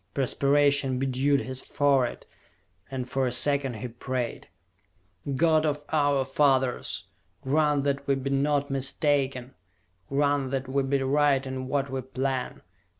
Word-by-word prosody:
Perspiration 140 Hz, 0 st, +2 dB
bedewed 135 Hz, +2 st, +1 dB
his 130 Hz, 0 st, -5 dB
forehead, 135 Hz, -4 st, +1 dB, 0.6 s
and 130 Hz, -2 st, -4 dB
for 130 Hz, 0 st, 0 dB
a -, -, -1 dB
second 140 Hz, 0 st, 0 dB
he 110 Hz, +3 st, -5 dB
prayed. 120 Hz, +1 st, -4 dB, 0.9 s
"God 155 Hz, +2 st, +3 dB
of 150 Hz, -1 st, -1 dB
our 145 Hz, -3 st, +2 dB
fathers! 135 Hz, -2 st, +1 dB, 0.4 s
Grant 145 Hz, +1 st, +2 dB
that 140 Hz, 0 st, -1 dB
we 140 Hz, -, +3 dB
be 135 Hz, +1 st, -3 dB
not 140 Hz, +1 st, +1 dB
mistaken! 135 Hz, -1 st, 0 dB, 0.6 s
Grant 140 Hz, -1 st, +1 dB
that 135 Hz, 0 st, -3 dB
we 135 Hz, +1 st, 0 dB
be 135 Hz, 0 st, 0 dB
right 140 Hz, 0 st, +2 dB
in 130 Hz, -1 st, -5 dB
what 140 Hz, 0 st, -1 dB
we 135 Hz, 0 st, -2 dB
plan! 130 Hz, 0 st, -3 dB
135 Hz, 135 wpm, -27 LUFS, 130-145 Hz, 0.9 s, God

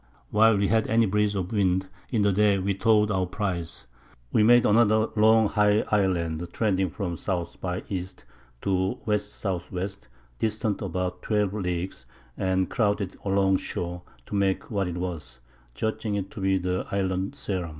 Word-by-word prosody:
While 110 Hz, 0 st, +5 dB
we 100 Hz, 0 st, +2 dB
had 110 Hz, -1 st, +2 dB
any 115 Hz, +1 st, +3 dB
Breeze 105 Hz, +1 st, +1 dB
of 95 Hz, -2 st, -3 dB
Wind, 95 Hz, -3 st, +1 dB, 0.2 s
in 110 Hz, -5 st, +2 dB
the 100 Hz, -1 st, +3 dB
Day 105 Hz, 0 st, +3 dB
we 100 Hz, +1 st, 0 dB
towed 105 Hz, +1 st, +3 dB
our 95 Hz, -2 st, 0 dB
Prize. 90 Hz, -4 st, -4 dB, 0.5 s
We -, -, +3 dB
made 120 Hz, +2 st, +6 dB
another 110 Hz, 0 st, +4 dB
long 110 Hz, 0 st, +5 dB
high 105 Hz, 0 st, +3 dB
Island 90 Hz, -5 st, +1 dB
trending 95 Hz, -4 st, +1 dB
from 90 Hz, +1 st, -4 dB
S. 85 Hz, -1 st, -3 dB
by 90 Hz, -1 st, -4 dB
E. 95 Hz, -3 st, -2 dB, 0.6 s
to 95 Hz, -1 st, +1 dB
W.S.W. 100 Hz, -3 st, -3 dB, 0.5 s
distant 110 Hz, -1 st, -1 dB
about 90 Hz, 0 st, -3 dB
12 105 Hz, -3 st, 0 dB
Leagues, 90 Hz, -8 st, -3 dB, 0.3 s
and 95 Hz, -1 st, 0 dB
crowded 105 Hz, -4 st, 0 dB
along 95 Hz, -1 st, +2 dB
Shore 90 Hz, -1 st, -4 dB, 0.2 s
to -, -, -10 dB
make 100 Hz, +1 st, 0 dB
what 100 Hz, -3 st, 0 dB
it 90 Hz, -1 st, -4 dB
was, 80 Hz, -8 st, -5 dB, 0.4 s
judging 110 Hz, -1 st, -2 dB
it 100 Hz, -1 st, -3 dB
to 100 Hz, -, -8 dB
be 95 Hz, 0 st, +2 dB
the 90 Hz, 0 st, -2 dB
Island 95 Hz, +3 st, -1 dB
Ceram. 95 Hz, -10 st, -3 dB
100 Hz, 160 wpm, -26 LUFS, 90-105 Hz, 0.6 s, made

